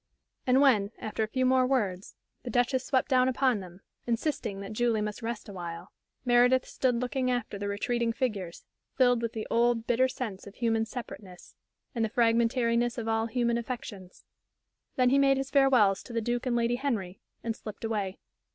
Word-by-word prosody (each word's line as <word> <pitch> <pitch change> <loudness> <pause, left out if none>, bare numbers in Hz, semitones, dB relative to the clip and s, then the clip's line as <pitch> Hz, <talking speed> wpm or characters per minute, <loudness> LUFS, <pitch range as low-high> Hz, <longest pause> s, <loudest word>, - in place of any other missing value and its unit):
And 255 +2 +5
when, 215 -8 +4
after 215 0 -4
a 220 - +1
few 255 +4 0
more 255 0 +4
words, 205 -8 -1 0.3
the 250 - -7
Duchess 245 +2 +1
swept 260 -1 +1
down 255 -2 +3
upon 260 -3 +2
them, 180 0 -11 0.3
insisting 230 -4 -2
that 200 +2 -7
Julie 235 0 +1
must 210 +2 -4
rest 230 -1 -5
awhile, 175 -2 -7 0.3
Meredith 245 +1 +4
stood 255 -2 0
looking 255 +2 -1
after 240 -5 -2
the 205 - -3
retreating 230 +3 -1
figures, 210 -9 -3 0.3
filled 245 -2 +4
with 230 -1 -3
the 220 -1 -4
old, 235 -1 +2
bitter 245 +2 +3
sense 220 -7 -6
of 200 - -11
human 225 -2 0
separateness, 205 -6 -9 0.4
and 230 -3 -1
the 220 - 0
fragmentariness 235 +1 +2
of 230 -2 -4
all 225 0 +1
human 235 0 0
affections. 215 -6 -8 0.7
Then 250 -1 +3
he 275 - +4
made 275 -1 +4
his 270 0 -3
farewells 255 -9 +4
to 240 - -11
the 230 - +1
Duke 240 +3 -2
and 245 - +1
Lady 235 +1 +1
Henry, 215 -9 -3 0.2
and 230 -1 -2
slipped 215 -1 -9
away. 205 -4 -2
235 Hz, 180 wpm, -29 LUFS, 215-255 Hz, 0.7 s, And